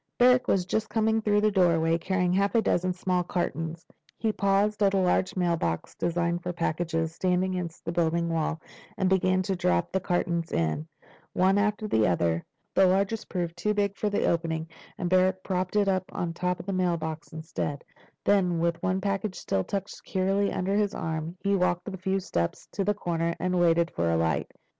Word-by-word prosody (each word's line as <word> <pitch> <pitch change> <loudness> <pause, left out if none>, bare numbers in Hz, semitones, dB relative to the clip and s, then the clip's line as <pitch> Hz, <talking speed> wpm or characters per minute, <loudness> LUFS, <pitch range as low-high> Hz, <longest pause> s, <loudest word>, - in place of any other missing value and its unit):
Barrack 250 +1 +5
was 185 -2 +2
just 220 +4 -1
coming 220 0 +1
through 210 -1 +2
the 215 0 +3
doorway, 165 -4 +3
carrying 180 0 0
half 200 +4 +1
a 230 - +5
dozen 185 -1 +1
small 180 0 0
cartons. 165 -1 -3 0.3
He 220 - 0
paused 200 +1 +1
at 200 -1 +4
a - - +3
large 185 0 +1
mailbox 170 - -1
designed 170 0 -1
for 180 - -3
packages, 165 -1 -1
standing 185 +1 0
against 175 -2 -5
the 165 - -2
building 170 0 +1
wall, 165 -1 -1 0.4
and 190 - +1
began 185 0 +2
to 190 +1 -1
drop 90 - +1
the 190 - +1
cartons 170 -2 -1
in, 85 - -1 0.5
one 190 +2 +3
after 210 +1 0
the 110 - +3
other. 85 -1 +1 0.3
The 190 - +5
largest 195 +4 0
proved 170 -2 -3
too 210 +4 -1
big 200 -1 0
for 210 - -1
the 205 - 0
opening, 165 -1 0 0.3
and 180 - -2
Barrack 185 +1 +2
propped 185 0 -2
it 205 -1 +3
on 185 -3 -1
top 180 +1 -1
of - - -8
the 195 - -2
mailbox 165 -4 -2
instead. 155 -2 -4 0.4
Then, 185 -4 +3
with 170 0 0
one 185 +1 0
package 195 0 -1
still 95 - -1
tucked 195 - -4
securely 195 +1 0
under 190 +2 -1
his 205 -1 +1
arm, 160 +2 -4
he 200 0 +2
walked 180 -2 +1
the 200 - -5
few 190 +1 -1
steps 85 - -2
to 200 - -1
the 205 +2 +1
corner, 170 -3 -1
and 180 0 0
waited 170 -1 +3
for 85 0 0
a 85 - +2
light. 80 -2 0
180 Hz, 190 wpm, -27 LUFS, 165-195 Hz, 0.5 s, Barrack